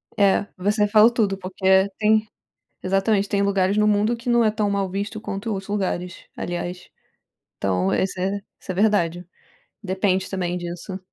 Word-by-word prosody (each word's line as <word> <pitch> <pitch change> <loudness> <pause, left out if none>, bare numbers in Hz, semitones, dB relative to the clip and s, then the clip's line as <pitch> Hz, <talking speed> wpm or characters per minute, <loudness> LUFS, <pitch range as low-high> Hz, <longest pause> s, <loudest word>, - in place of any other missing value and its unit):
É, 200 -2 +3
você 210 +3 +1
falou 215 +2 +6
tudo, 205 -5 0
porque 190 +1 +2
tem 215 0 +3 0.6
exatamente, 195 +2 +1
tem 200 -1 +1
lugares 200 0 +1
no 210 0 +4
mundo 210 +3 +2
que 235 +1 -6
não 240 -1 +4
é 215 - +3
tão 210 -1 -1
mal 200 -1 -1
visto 200 +3 -4
quanto 205 +1 -5
outros 195 -1 -5
lugares, 185 -3 -3
aliás, 175 +1 -5 0.7
então 95 -1 0
esse 190 -1 -1
é 195 +2 -1 0.2
isso - - -9
é 185 - -2
verdade. 180 -4 +1 0.6
Depende 190 -1 0
também 180 -2 -2
disso. 175 +2 -6
195 Hz, 160 wpm, -23 LUFS, 185-210 Hz, 0.7 s, falou